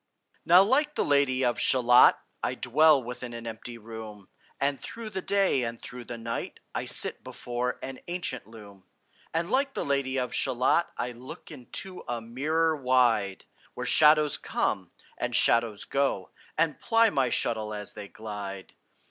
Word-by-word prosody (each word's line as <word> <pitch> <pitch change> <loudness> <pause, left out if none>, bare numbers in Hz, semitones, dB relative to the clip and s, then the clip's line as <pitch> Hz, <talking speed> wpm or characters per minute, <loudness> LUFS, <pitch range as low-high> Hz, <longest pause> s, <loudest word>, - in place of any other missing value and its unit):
Now 180 +3 +7
like 290 +8 +2
the - - +1
Lady 135 -2 +3
of 120 - 0
Shalott, 125 -1 +6 0.2
I - - -1
dwell 145 +2 +4
within 125 0 -7
an 115 0 -8
empty 115 +1 -7
room, 110 -3 -10 0.3
And 140 0 0
through 230 -2 -8
the 190 -2 -3
day 195 -8 +2
and 115 -1 -4
through 125 0 -9
the 120 - -6
night 115 0 -5
I - - -3
sit - - 0
before 125 +1 -3
an 135 -1 -6
ancient 170 - -3
loom. 100 -4 -14 0.4
And 165 +4 -2
like 275 +1 +1
the - - -2
Lady 140 -1 0
of 125 -1 -2
Shalott 130 +6 +2
I 125 - -2
look 125 +2 -11
into 180 +9 -7
a 120 -1 -2
mirror 155 +8 0
wide, 125 -8 +2 0.3
Where - - -4
shadows 150 -1 +5
come, - - -1 0.3
and - - -2
shadows 115 -3 +2
go, 135 -9 -1 0.3
And 160 -3 +1
ply 225 -1 +3
my 135 -4 +1
shuttle 110 -3 -1
as 105 -1 -4
they 105 -1 -8
glide. 100 -2 -7
125 Hz, 160 wpm, -27 LUFS, 115-150 Hz, 0.4 s, Now